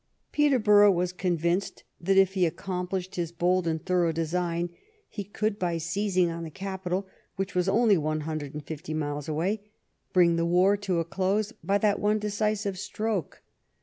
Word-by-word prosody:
Peterborough 215 -9 +5
was 180 0 0
convinced 175 0 -1 0.2
that, 190 +2 +1
if 195 -1 +5
he 190 -2 +1
ac 160 - -4
complished 185 0 -4
his 170 -2 -2
bold 180 +1 +1
and 160 -1 -2
thorough 180 -3 +2
design, 170 +1 -1 0.4
he 205 - -6
could, 205 +1 -2
by 175 -2 0
seizing 185 +2 +1
on 165 0 -5
the 165 - -5
capital, 190 +2 -4 0.3
which 195 0 -3
was 180 +1 +1
only 210 -2 +4
one 155 0 -1
hundred 150 -2 -5
and 150 -1 -6
fifty 155 0 -5
miles 145 0 -3
away, 180 +8 -1 0.5
bring 170 -2 +4
the 170 - +1
war 180 +4 +4
to 200 -3 -2
a 165 - -1
close 195 +5 0
by 200 +1 +2
that 205 -1 +2
one 210 +1 +2
decisive 210 -2 -1
stroke. 210 -5 -3
185 Hz, 175 wpm, -27 LUFS, 170-200 Hz, 0.5 s, Peterborough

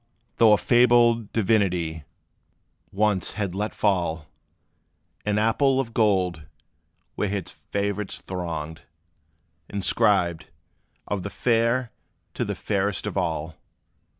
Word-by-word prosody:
Though 110 -2 +6
a - - +5
fabled 120 -2 +4
divinity 90 -8 0 0.9
once 105 -2 +1
had 100 -4 -3
let 105 +3 -3
fall 85 -6 0 1.0
An 105 0 +1
apple 130 +5 +2
of 115 -4 -3
gold, 95 -8 +1 0.7
where 105 - -1
his 100 -3 -4 0.2
favorites 100 0 -2
thronged, 80 -4 -5 0.9
Inscribed, 90 -4 +1 0.6
"Of 100 -2 -2
the 100 - -5
fair, 115 +2 +1 0.4
to - - -2
the - - -3
fairest 100 -1 -1
of - - -4
all!" 80 0 -2
100 Hz, 105 wpm, -25 LUFS, 90-110 Hz, 1.0 s, Though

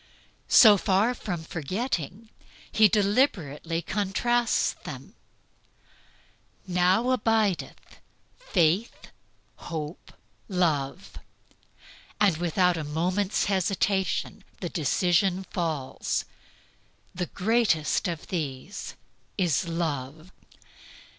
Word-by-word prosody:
So 215 -4 +8
far 200 +5 +2
from 180 -9 -5
forgetting, 185 - -4 0.4
he 215 0 +6
deliberately 190 - 0
contrasts 225 +4 +1
them, - - -9 1.5
"Now 185 +7 +2
abideth 220 -6 -1 0.4
Faith, 190 - 0 0.5
Hope, 160 -1 -7 0.4
Love," 170 -3 -1 1.0
and 200 -5 +4
without 175 +1 +2
a 160 - -3
moment's 180 +7 0
hesitation 195 0 0 0.2
the 175 - -4
decision 180 +4 +1
falls, 160 -7 -2 0.9
"The 180 -1 -3
greatest 205 -8 +1
of 170 -3 -4
these 155 0 -5 0.4
is 175 -3 +1
Love." 160 -1 -4
180 Hz, 75 wpm, -26 LUFS, 165-205 Hz, 1.5 s, So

